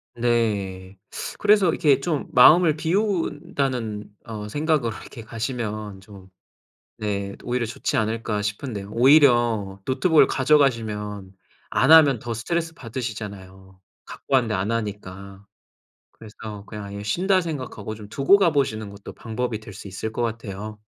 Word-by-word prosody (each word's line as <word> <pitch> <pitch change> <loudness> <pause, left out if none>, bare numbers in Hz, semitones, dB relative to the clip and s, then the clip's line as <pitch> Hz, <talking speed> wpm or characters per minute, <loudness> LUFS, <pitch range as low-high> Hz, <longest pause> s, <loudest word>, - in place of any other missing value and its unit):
네. 100 -6 -1 0.4
그래서 205 -2 +4
이렇게 145 -6 +3
좀 150 0 -2
마음을 155 +5 +7
비운다는 145 - -2
어 105 -2 -6
생각으로 145 -3 0
이렇게 115 -4 -10
가시면 110 -4 -5
좀 95 -1 -14 1.2
오히려 120 -1 -1
좋지 115 - -3
않을까 110 -1 -1
싶은데요. 105 -1 -4
오히려 120 -7 +4
노트북을 150 +5 +4
가져가시면 110 -8 +1 0.4
안 135 - +2
하면 145 -6 +7
더 120 - -5
스트레스 165 +7 -2
받으시잖아요. 100 - -7 0.3
갖고 135 - -6
왔는데 120 -4 +3
안 95 +3 -1
하니까. 100 -3 -5 0.7
그래서 105 -2 -10
그냥 105 -1 -8
아예 100 0 -7
쉰다 185 - +2
생각하고 130 - -5
좀 105 -1 -11
두고 140 - +4
가보시는 135 - +1
것도 100 0 -11
방법이 115 -1 -4
될 110 -2 -11
수 100 - -10
있을 100 +3 -5
것 120 - -4
같아요. 110 -2 -5
115 Hz, 305 characters per minute, -23 LUFS, 105-140 Hz, 1.2 s, 마음을